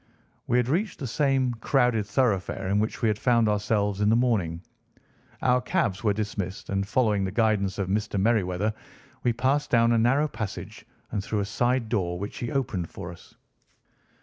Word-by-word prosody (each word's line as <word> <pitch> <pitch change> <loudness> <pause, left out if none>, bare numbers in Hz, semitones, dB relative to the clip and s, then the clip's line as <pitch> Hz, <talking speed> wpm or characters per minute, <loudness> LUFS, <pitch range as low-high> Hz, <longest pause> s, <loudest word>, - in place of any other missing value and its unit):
We 120 - +2
had 125 -1 +2
reached 180 +9 0
the 140 - -5
same 135 0 +1
crowded 120 -2 +1
thoroughfare 100 -6 0
in 100 +1 +2
which 110 +3 -2
we - - +4
had 105 -1 0
found 120 -3 +3
ourselves 105 -1 0
in 105 - +3
the 110 - +4
morning. 100 -9 0 0.8
Our 125 0 +3
cabs 105 -5 -1
were 105 - +3
dismissed, 100 -3 -4
and, 100 0 -1
following 105 -3 +2
the 95 - -2
guidance 105 -3 +1
of 100 -2 -1
Mr. 105 +1 -1
Merryweather, 105 -1 +1 0.5
we 120 - +2
passed 130 +5 0
down 115 -1 +4
a 115 - +3
narrow 135 +6 +3
passage 110 -8 -6 0.3
and 105 -3 -2
through 105 0 -1
a - - -1
side 120 +4 0
door, 90 -6 -1
which 100 +3 -6
he 120 - -3
opened 105 -11 -2
for 85 - -7
us. 85 - -15
110 Hz, 180 wpm, -26 LUFS, 100-125 Hz, 0.8 s, we